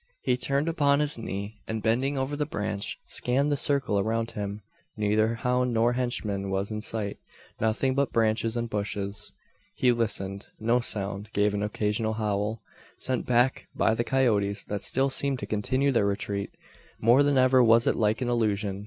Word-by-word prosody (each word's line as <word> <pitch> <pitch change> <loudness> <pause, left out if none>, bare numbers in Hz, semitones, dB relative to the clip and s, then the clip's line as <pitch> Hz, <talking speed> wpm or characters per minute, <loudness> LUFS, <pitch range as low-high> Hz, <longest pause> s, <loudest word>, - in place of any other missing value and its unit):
He - - +2
turned 140 +4 -1
upon 145 -4 +3
his 150 -5 0
knee, 105 0 -5
and 110 -1 -3
bending 130 +5 +1
over 135 +2 -1
the 150 0 -2
branch, 105 -10 -3
scanned 135 +4 0
the - - +3
circle 135 -7 +1
around 115 +2 -1
him. 105 0 -5 0.3
Neither 110 +2 +2
hound 125 0 0
nor 115 +2 +3
henchman 105 -6 -2
was 95 +2 -2
in 105 0 -3
sight. 105 -2 -3 0.4
Nothing 115 +4 +1
but 140 +1 0
branches 115 +1 +1
and 120 0 -1
bushes! 100 -1 -3 0.4
He 125 - +3
listened. 100 -4 -1
No 115 +3 +2
sound, 100 -2 -3
save 105 0 +2
an 100 - -1
occasional 105 +1 -1
howl, 105 0 -2 0.3
sent 130 -2 -2
back 125 +1 +2
by - - +2
the 115 - 0
coyotes 105 -7 +1
that 105 -1 -4
still 135 +5 +2
seemed 140 0 +2
to - - -5
continue 130 +7 0
their 115 -5 +2
retreat! 100 0 -2 0.5
More 120 +5 +5
than 145 -1 +3
ever 130 0 +5
was 115 0 +5
it - - +2
like 110 +2 +1
an - - -2
illusion. 105 -4 0
115 Hz, 175 wpm, -27 LUFS, 105-130 Hz, 0.5 s, More